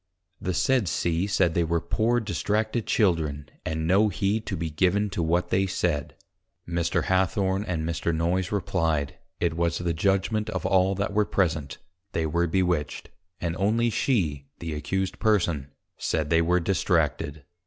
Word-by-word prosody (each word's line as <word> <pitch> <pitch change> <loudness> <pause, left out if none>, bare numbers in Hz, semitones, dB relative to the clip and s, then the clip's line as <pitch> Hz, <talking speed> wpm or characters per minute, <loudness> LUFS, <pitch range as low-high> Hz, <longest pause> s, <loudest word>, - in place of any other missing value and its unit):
_ - - -13
The 90 -1 -1
said 130 -2 +2
C. 85 +3 0
said, 95 -4 +2
they 85 - +2
were 85 +1 +1
poor 115 +7 +1
distracted 110 +1 -1
Children, 80 -8 +1 0.2
and 80 0 -2
no 100 +5 +4
heed 100 +3 -1
to 95 - -2
be 80 -1 -3
given 95 +6 +1
to 90 - -2
what 85 +2 +1
they 95 +1 +2
said. 75 -6 -1 0.5
Mr. 85 -1 0
Hathorne 95 +1 +1
and 85 -5 -2
Mr. 85 0 -1
Noyes 85 +3 0
replyed, 80 -7 -1 0.2
It 80 - 0
was 85 0 0
the 85 -1 -1
Judgment 100 +5 +1
of - - -3
all 95 0 +3
that 100 +1 -2
were 105 0 +3
present, 80 -10 -1 0.4
they 80 - 0
were 85 +3 +1
Bewitched, 90 -4 -1 0.3
and 85 -1 -2
only 115 +5 +2
she 80 - 0
the 80 -2 -5
Accused 95 +6 -2
Person 85 - +1 0.3
said, 75 -1 -1
they 80 0 +5
were 90 +2 +3
Distracted. 80 -5 0
90 Hz, 165 wpm, -26 LUFS, 80-100 Hz, 0.5 s, they